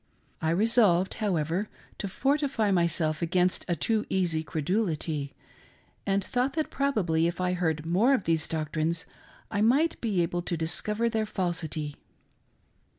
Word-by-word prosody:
I 160 Hz, -, +1 dB
resolved, 195 Hz, -1 st, +3 dB
however, 180 Hz, 0 st, 0 dB, 0.3 s
to 200 Hz, -, -2 dB
fortify 270 Hz, 0 st, +1 dB
myself 170 Hz, -3 st, +1 dB
against 180 Hz, +2 st, +1 dB
a 175 Hz, -, +1 dB
too 220 Hz, +4 st, 0 dB
easy 175 Hz, -4 st, +1 dB
credulity, 155 Hz, -4 st, -1 dB, 0.7 s
and 195 Hz, 0 st, +2 dB
thought 250 Hz, +2 st, 0 dB
that 310 Hz, 0 st, -2 dB
probably 185 Hz, -13 st, +1 dB
if 170 Hz, +1 st, -4 dB
I 180 Hz, 0 st, +1 dB
heard 160 Hz, -4 st, -1 dB
more 210 Hz, +11 st, +4 dB
of 210 Hz, -, -2 dB
these 160 Hz, -1 st, 0 dB
doqtrines 160 Hz, +1 st, -1 dB, 0.5 s
I 205 Hz, -1 st, 0 dB
might 275 Hz, +9 st, +3 dB
be 200 Hz, -7 st, +1 dB
able 175 Hz, +1 st, -2 dB
to 170 Hz, -1 st, -3 dB
discover 210 Hz, +8 st, 0 dB
their 220 Hz, -2 st, 0 dB
falsity. 165 Hz, -6 st, -2 dB
180 Hz, 140 wpm, -28 LUFS, 165-215 Hz, 0.7 s, more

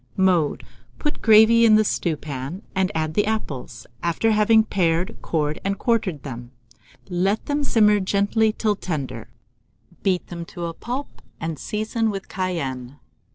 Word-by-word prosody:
Mode. 180 Hz, -6 st, +2 dB, 0.3 s
Put 295 Hz, -, -1 dB
the -, -, -15 dB
gravy 220 Hz, +1 st, +6 dB
in 215 Hz, -2 st, +7 dB
a 215 Hz, -, +4 dB
stewpan, 155 Hz, -2 st, -3 dB
and 190 Hz, 0 st, +1 dB
add 155 Hz, -1 st, -1 dB
the 205 Hz, +3 st, +1 dB
apples, 215 Hz, -12 st, -4 dB, 0.2 s
after 170 Hz, +7 st, +1 dB
having 220 Hz, +1 st, +5 dB
pared, 180 Hz, -1 st, 0 dB
cored, 150 Hz, -2 st, -1 dB
and 195 Hz, 0 st, -1 dB
quartered 205 Hz, -, 0 dB
them. 120 Hz, -3 st, -7 dB, 0.6 s
Let 190 Hz, +3 st, 0 dB
them 290 Hz, 0 st, -1 dB
simmer 210 Hz, -6 st, +4 dB
gently 200 Hz, +3 st, +2 dB
till 215 Hz, -1 st, 0 dB
tender; 140 Hz, -, -5 dB, 0.7 s
beat 185 Hz, -3 st, 0 dB
them 170 Hz, -1 st, -7 dB
to 170 Hz, +1 st, -6 dB
a 165 Hz, -, -4 dB
pulp, 250 Hz, -, -6 dB, 0.2 s
and 160 Hz, -2 st, -4 dB
season 220 Hz, +1 st, -1 dB
with 195 Hz, -2 st, -5 dB
cayenne. 140 Hz, -8 st, -3 dB
190 Hz, 150 wpm, -23 LUFS, 160-215 Hz, 0.7 s, in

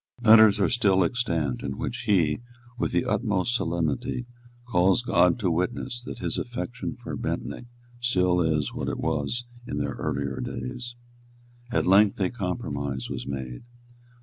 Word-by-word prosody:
Letters 110 Hz, -2 st, +8 dB
are 100 Hz, -, +4 dB
still 100 Hz, -6 st, +3 dB
extant 85 Hz, -, -1 dB
in 65 Hz, -1 st, -4 dB
which -, -, -4 dB
he, 85 Hz, -4 st, +3 dB, 0.3 s
with 120 Hz, -, -1 dB
the 85 Hz, -, +1 dB
utmost 105 Hz, -1 st, 0 dB
solemnity, 120 Hz, -, -1 dB, 0.4 s
calls 95 Hz, +2 st, +3 dB
God 90 Hz, 0 st, +4 dB
to 100 Hz, -7 st, 0 dB
witness 105 Hz, +7 st, -1 dB
that -, -, -6 dB
his -, -, -2 dB
affection 125 Hz, 0 st, -4 dB
for -, -, -4 dB
Bentinck 120 Hz, -, -4 dB, 0.3 s
still 90 Hz, -7 st, +2 dB
is 80 Hz, -3 st, 0 dB
what -, -, -3 dB
it -, -, -3 dB
was 95 Hz, -, -1 dB, 0.2 s
in 70 Hz, -, -3 dB
their 70 Hz, -1 st, -1 dB
early 70 Hz, +3 st, -2 dB, 0.2 s
days. 120 Hz, -, -5 dB, 0.8 s
At -, -, +1 dB
length 100 Hz, +3 st, +5 dB
a 95 Hz, -2 st, +1 dB
compromise 70 Hz, -, -3 dB
was -, -, -5 dB
made. 65 Hz, -3 st, -5 dB
90 Hz, 150 wpm, -26 LUFS, 75-120 Hz, 0.8 s, Letters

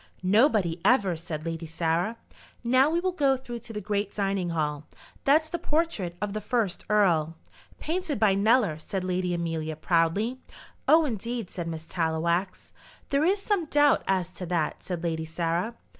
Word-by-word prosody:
"Nobody, 195 Hz, -, +3 dB
ever," 200 Hz, -8 st, +3 dB
said 160 Hz, -1 st, -6 dB
Lady 165 Hz, 0 st, -4 dB
Sarah. 170 Hz, +7 st, -1 dB, 0.5 s
"Now 255 Hz, +4 st, +4 dB
we 335 Hz, +2 st, +1 dB
will 370 Hz, +1 st, 0 dB
go 280 Hz, -6 st, +2 dB
through 240 Hz, -2 st, -7 dB
to 235 Hz, 0 st, -9 dB
the 210 Hz, -, -4 dB
great 205 Hz, -1 st, -1 dB
dining 195 Hz, -3 st, 0 dB
hall. 150 Hz, -3 st, -2 dB, 0.4 s
That's 310 Hz, +3 st, +4 dB
the 345 Hz, +2 st, -4 dB
portrait 300 Hz, -, -1 dB
of 210 Hz, 0 st, -3 dB
the 215 Hz, -, -3 dB
first 210 Hz, -3 st, -1 dB
earl." 170 Hz, -7 st, +3 dB, 0.4 s
"Painted 330 Hz, -1 st, -2 dB
by 210 Hz, -3 st, +4 dB
Kneller," 205 Hz, -5 st, +3 dB
said 190 Hz, +3 st, -4 dB
Lady 180 Hz, 0 st, -1 dB
Amelia, 165 Hz, -2 st, -2 dB
proudly. 175 Hz, +10 st, +1 dB, 0.5 s
"Oh, 320 Hz, 0 st, +6 dB
indeed," 235 Hz, -4 st, -4 dB
said 175 Hz, -3 st, -5 dB
Miss 160 Hz, -1 st, -5 dB
Tallowax. 170 Hz, +3 st, -1 dB, 0.4 s
"There 280 Hz, +1 st, +2 dB
is 390 Hz, +4 st, +2 dB
some 400 Hz, -6 st, +1 dB
doubt 290 Hz, -1 st, +4 dB
as 185 Hz, -2 st, 0 dB
to 180 Hz, -1 st, -7 dB
that," 165 Hz, -3 st, -1 dB
said 175 Hz, -2 st, -5 dB
Lady 160 Hz, -1 st, -1 dB
Sarah. 170 Hz, +7 st, -2 dB
195 Hz, 165 wpm, -27 LUFS, 165-250 Hz, 0.5 s, Oh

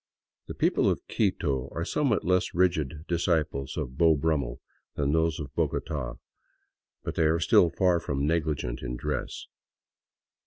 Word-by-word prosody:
The -, -, -6 dB
people -, -, +2 dB
of -, -, -2 dB
Quito 65 Hz, -1 st, 0 dB
are 85 Hz, -, -3 dB
somewhat 135 Hz, -4 st, +1 dB
less 90 Hz, 0 st, +1 dB
rigid 80 Hz, -4 st, +1 dB
disciples 80 Hz, -5 st, 0 dB
of 65 Hz, +2 st, -4 dB
Beau 80 Hz, -2 st, +6 dB
Brummel 70 Hz, -5 st, -1 dB, 0.4 s
than 70 Hz, -1 st, 0 dB
those 80 Hz, +1 st, +1 dB
of 70 Hz, -3 st, -7 dB
Bogota, 65 Hz, -5 st, -2 dB, 0.9 s
but -, -, -3 dB
they 80 Hz, -, +2 dB
are 80 Hz, +2 st, +2 dB
still 85 Hz, +1 st, +5 dB
far 90 Hz, 0 st, +2 dB
from 70 Hz, -3 st, -2 dB
negligent 75 Hz, -6 st, -1 dB
in 60 Hz, -1 st, -4 dB
dress. -, -, -4 dB
80 Hz, 145 wpm, -28 LUFS, 70-85 Hz, 0.9 s, Beau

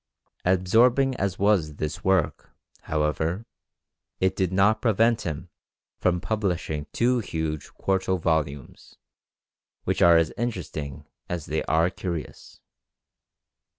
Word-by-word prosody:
Absorbing 120 Hz, +9 st, +4 dB
as 95 Hz, -1 st, -1 dB
was 95 Hz, -7 st, +2 dB
this 75 Hz, +1 st, -4 dB
work, 95 Hz, -5 st, +1 dB, 0.4 s
however, 80 Hz, +6 st, -1 dB, 0.7 s
it 95 Hz, 0 st, +1 dB
did 95 Hz, -2 st, 0 dB
not 105 Hz, +3 st, +3 dB
prevent 115 Hz, 0 st, +3 dB
him 80 Hz, +3 st, -5 dB, 0.5 s
from 90 Hz, -1 st, +2 dB
publishing 90 Hz, -6 st, -2 dB
two 125 Hz, +1 st, +2 dB
huge 80 Hz, -7 st, -4 dB
quarto 95 Hz, -1 st, 0 dB
volumes, 75 Hz, -5 st, -2 dB, 0.9 s
which -, -, -1 dB
are 85 Hz, -1 st, +7 dB
as 80 Hz, -2 st, +1 dB
interesting 80 Hz, -, -4 dB, 0.2 s
as 85 Hz, -3 st, -3 dB
they 80 Hz, +1 st, -1 dB
are 80 Hz, +3 st, +2 dB
curious. 85 Hz, -6 st, -6 dB
90 Hz, 110 wpm, -25 LUFS, 80-100 Hz, 0.9 s, are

